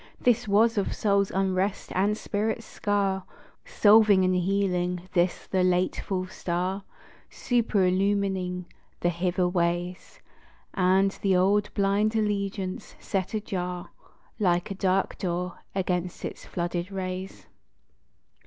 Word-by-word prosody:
This 240 Hz, -2 st, +2 dB
was 215 Hz, +2 st, +4 dB
of 200 Hz, -, -2 dB
soul's 200 Hz, -2 st, +2 dB
unrest 190 Hz, +1 st, -1 dB
and 205 Hz, +3 st, +1 dB
spirit's 220 Hz, +2 st, -2 dB
scar 200 Hz, -2 st, -1 dB, 0.4 s
Solving 210 Hz, -, +5 dB
and 185 Hz, -, +2 dB
healing; 180 Hz, -1 st, 0 dB
this 175 Hz, 0 st, +1 dB
the 190 Hz, -, 0 dB
late 180 Hz, 0 st, +2 dB
full 185 Hz, -2 st, -2 dB
star 185 Hz, +2 st, -3 dB, 0.5 s
Superillumining 195 Hz, -4 st, 0 dB, 0.4 s
the 175 Hz, -, +2 dB
hither 180 Hz, +1 st, 0 dB
ways, 175 Hz, -, -2 dB, 0.5 s
And 190 Hz, +1 st, +3 dB
the 195 Hz, -2 st, +3 dB
old 200 Hz, +3 st, +2 dB
blind 205 Hz, +2 st, +2 dB
allegiance 200 Hz, -3 st, -2 dB
set 190 Hz, +2 st, -2 dB
ajar 180 Hz, -4 st, -4 dB, 0.5 s
Like 180 Hz, -1 st, +1 dB
a -, -, 0 dB
dark 190 Hz, 0 st, 0 dB
door, 180 Hz, -1 st, -3 dB, 0.2 s
against 180 Hz, -2 st, -2 dB
its -, -, -7 dB
flooded 175 Hz, +1 st, -3 dB
rays. 185 Hz, 0 st, -5 dB
190 Hz, 115 wpm, -27 LUFS, 180-200 Hz, 0.5 s, Solving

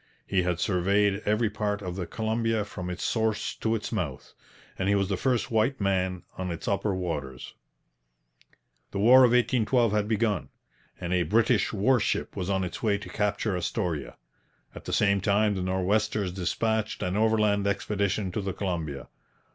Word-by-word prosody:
He 95 Hz, -2 st, +1 dB
had 90 Hz, -1 st, -1 dB
surveyed 100 Hz, +1 st, +2 dB
every 105 Hz, +1 st, +2 dB
part 105 Hz, -1 st, -2 dB
of 90 Hz, -1 st, -4 dB
the 90 Hz, -2 st, -4 dB
Columbia 110 Hz, -1 st, -1 dB
from 90 Hz, -3 st, -6 dB
its 90 Hz, -, -5 dB
source 110 Hz, -2 st, 0 dB
to 115 Hz, 0 st, 0 dB
its 110 Hz, -, -4 dB
mouth. 85 Hz, -, -4 dB, 0.5 s
And 95 Hz, -, 0 dB
he 100 Hz, -, +4 dB
was 100 Hz, -1 st, +1 dB
the 100 Hz, -, +1 dB
first 125 Hz, +4 st, 0 dB
white 115 Hz, +5 st, +1 dB
man 95 Hz, -2 st, 0 dB, 0.2 s
on 90 Hz, -1 st, -2 dB
its 85 Hz, -1 st, -6 dB
upper 100 Hz, 0 st, 0 dB
waters. 75 Hz, -8 st, -5 dB, 1.4 s
The -, -, -5 dB
War 115 Hz, +6 st, +7 dB
of 125 Hz, -2 st, +7 dB
1812 120 Hz, -1 st, +2 dB
had 105 Hz, -1 st, +1 dB
begun, 110 Hz, -4 st, 0 dB, 0.5 s
and 85 Hz, +1 st, -3 dB
a 90 Hz, -, +3 dB
British 110 Hz, +3 st, +2 dB
warship 115 Hz, +3 st, +1 dB
was 95 Hz, -1 st, -3 dB
on 95 Hz, -1 st, +1 dB
its 90 Hz, -, -5 dB
way 105 Hz, -3 st, +2 dB
to 105 Hz, -, -9 dB
capture 105 Hz, -1 st, -1 dB
Astoria. 85 Hz, -4 st, -3 dB, 0.6 s
At -, -, -11 dB
the -, -, -4 dB
same 100 Hz, -1 st, +3 dB
time 105 Hz, +1 st, +2 dB
the 95 Hz, -, -3 dB
Nor'westers 95 Hz, +2 st, 0 dB
dispatched 110 Hz, +4 st, -1 dB
an 90 Hz, +1 st, -1 dB
overland 105 Hz, -2 st, +2 dB
expedition 100 Hz, -1 st, -1 dB
to 105 Hz, -, -2 dB
the 95 Hz, -1 st, -3 dB
Columbia. 85 Hz, -8 st, -4 dB
100 Hz, 170 wpm, -27 LUFS, 90-110 Hz, 1.4 s, War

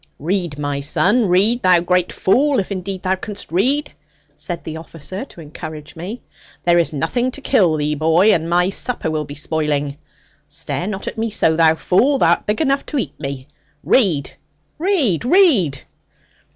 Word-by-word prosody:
'Read, 170 Hz, -1 st, -2 dB
my 145 Hz, -1 st, -2 dB
son; 205 Hz, -, +2 dB
read, 205 Hz, +7 st, +2 dB
thou 185 Hz, -3 st, +5 dB
great 180 Hz, +1 st, +1 dB
fool, 275 Hz, +8 st, +2 dB
if 195 Hz, -, -4 dB
indeed 190 Hz, 0 st, -4 dB
thou 185 Hz, 0 st, +1 dB
canst 200 Hz, 0 st, -7 dB
read,' 265 Hz, -, +1 dB, 0.4 s
said 170 Hz, +3 st, -6 dB
the 160 Hz, -, -6 dB
officer 165 Hz, -, -8 dB
to 220 Hz, -, -16 dB
encourage 150 Hz, -1 st, -9 dB
me; 190 Hz, +9 st, -7 dB, 0.4 s
'there 175 Hz, 0 st, +4 dB
is 170 Hz, -, +1 dB
nothing 240 Hz, -, -1 dB
to 265 Hz, -, -8 dB
kill 195 Hz, -, +2 dB
thee, 150 Hz, 0 st, -1 dB
boy, 165 Hz, +7 st, +3 dB
and 165 Hz, 0 st, -1 dB
my 175 Hz, +1 st, +3 dB
supper 235 Hz, -6 st, -2 dB
will 155 Hz, -1 st, -2 dB
be 145 Hz, -, -9 dB
spoiling. 150 Hz, -2 st, -2 dB, 0.5 s
Stare 145 Hz, +3 st, -4 dB
not 200 Hz, -2 st, -5 dB
at -, -, -5 dB
me 225 Hz, +1 st, -1 dB
so, 165 Hz, -6 st, +1 dB
thou 160 Hz, -1 st, +4 dB
fool; 230 Hz, -, +2 dB
thou 170 Hz, -9 st, +3 dB
art 170 Hz, -, 0 dB
big 210 Hz, +6 st, 0 dB
enough 275 Hz, -2 st, +1 dB
to 295 Hz, -, -3 dB
eat 155 Hz, -, -2 dB
me; 135 Hz, -2 st, -6 dB, 0.4 s
read, 175 Hz, -, +2 dB, 0.5 s
read, 310 Hz, -, +1 dB
read.' 245 Hz, -, +3 dB
175 Hz, 175 wpm, -19 LUFS, 155-220 Hz, 0.5 s, thou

